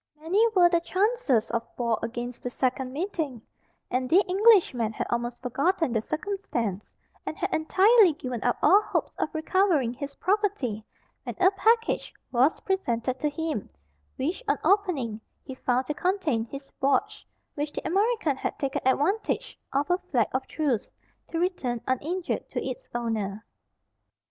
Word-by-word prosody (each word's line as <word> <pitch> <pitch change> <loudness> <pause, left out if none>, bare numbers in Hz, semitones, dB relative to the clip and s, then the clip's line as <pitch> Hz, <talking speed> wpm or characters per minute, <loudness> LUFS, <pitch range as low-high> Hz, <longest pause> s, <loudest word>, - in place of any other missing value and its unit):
Many 355 +8 +2
were 355 -2 +7
the 345 -1 +2
chances 370 - +1
of 235 -1 0 0.2
war 235 -2 0
against 240 +1 -5
the 245 - -3
second 255 +1 -1
meeting, 310 - -3 0.5
and 255 0 0
the 375 +6 +5
Englishman 370 - +4
had - - -3
almost 240 0 -2
forgotten 280 +4 +1
the 220 - +1
circumstance, 280 - -3 0.3
and 315 - -5
had 380 - -2
entirely 385 +4 +5
given 255 -4 -5
up - - +1
all 405 - +7
hopes - - -2
of - - 0
recovering 315 - +2
his 280 +2 -7
property, 370 - 0 0.4
when - - -6
a 370 +1 +6
package 455 +3 +2 0.2
was 260 +5 +3
presented 255 -10 -1
to 300 - +1
him, 305 -6 -3 0.5
which, 320 - -2
on - - +2
opening, 300 - +1 0.2
he 265 - -7
found 255 0 0
to[Pg - - -21
63] 360 +2 +3
contain 270 - -1
his 275 +3 -9
watch, 275 +1 +1 0.3
which 290 0 -3
the - - -6
American 395 - +1
had - - -3
taken 275 -1 -2
advantage 350 +11 0
of 280 +2 0
a 355 - +2
flag 240 -6 +2
of 260 +1 -1
truce, 275 -8 -1 0.4
to 330 - -3
return 330 -9 -1
uninjured 325 +8 -2
to - - -3
its - - -6
owner. 220 -3 -2
290 Hz, 155 wpm, -27 LUFS, 245-375 Hz, 0.5 s, were